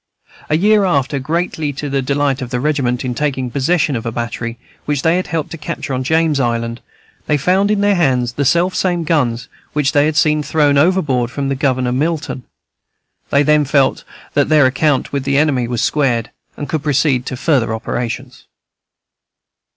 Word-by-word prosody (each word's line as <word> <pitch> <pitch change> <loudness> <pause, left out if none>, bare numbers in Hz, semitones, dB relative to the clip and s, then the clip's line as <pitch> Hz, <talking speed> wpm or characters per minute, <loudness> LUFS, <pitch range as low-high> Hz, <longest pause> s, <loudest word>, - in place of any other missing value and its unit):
A 155 - +3
year 210 +3 +4
after, 140 -6 0
greatly 160 +1 -2
to 145 +2 -5
the 140 -1 -1
delight 140 0 0
of 125 - -5
the 125 -1 -2
regiment, 130 -3 0
in 125 - -2
taking 130 -2 -2
possession 145 +2 +1
of 115 - -3
a 115 - -3
battery 115 0 -4 0.3
which 145 -2 -1
they 165 +1 +3
had 185 - -2
helped 160 -1 -3
to 165 - -7
capture 150 -3 -5
on 130 0 -1
James 160 +1 +1
Island, 115 -1 -1 0.5
they 150 - +2
found 185 +7 +2
in 210 -1 +1
their 205 0 +3
hands 130 -9 +1
the 140 - -1
selfsame 175 +3 +1
guns 125 -7 0 0.3
which 145 -2 +1
they 145 -1 +3
had 155 - -1
seen 150 0 +3
thrown 145 -1 +2
overboard 140 -6 +2
from 140 +2 -3
the 135 - 0
Governor 130 -2 0
Milton. 145 -1 -2 0.8
They 140 +1 +3
then 150 +1 +3
felt 140 -1 +1 0.3
that 145 0 +2
their 155 -3 +5
account 135 +2 +1
with 140 -1 -1
the 140 0 +1
enemy 140 -5 +2
was 120 0 -2
squared, 120 -6 0 0.3
and 145 - -5
could 155 - -2
proceed 140 -3 +1
to 130 - -4
further 130 -6 +1
operations. 120 +3 -4
140 Hz, 180 wpm, -17 LUFS, 125-155 Hz, 0.8 s, their